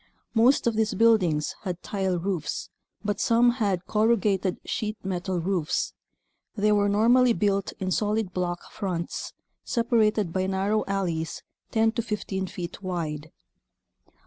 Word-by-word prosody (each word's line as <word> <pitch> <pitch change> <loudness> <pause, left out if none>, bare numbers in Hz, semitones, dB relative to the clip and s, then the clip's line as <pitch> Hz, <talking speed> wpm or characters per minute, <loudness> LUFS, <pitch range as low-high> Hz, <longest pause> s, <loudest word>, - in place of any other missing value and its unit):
Most 245 +4 +4
of 235 -2 +2
these 220 -1 +1
buildings 185 -10 +3
had 180 -3 -5
tile 190 -3 -1
roofs, 175 -3 -3 0.3
but 205 -1 -1
some 235 +3 +4
had 190 -4 +1
corrugated 210 -4 +2
sheet 215 0 -2
metal 185 0 -2
roofs. 170 -3 -1 0.6
They 210 0 +2
were 205 -1 +3
normally 235 +4 +5
built 200 -3 0
in 185 -1 -2
solid 210 -1 0
block 175 -1 -3
fronts 180 -5 -4 0.3
separated 220 -6 +1
by 185 0 0
narrow 195 +3 +1
alleys 175 -5 -2 0.3
10 225 0 +3
to 230 - -1
15 200 -4 -3
feet 175 +1 -7
wide. 160 -5 -4
195 Hz, 130 wpm, -26 LUFS, 180-220 Hz, 0.6 s, normally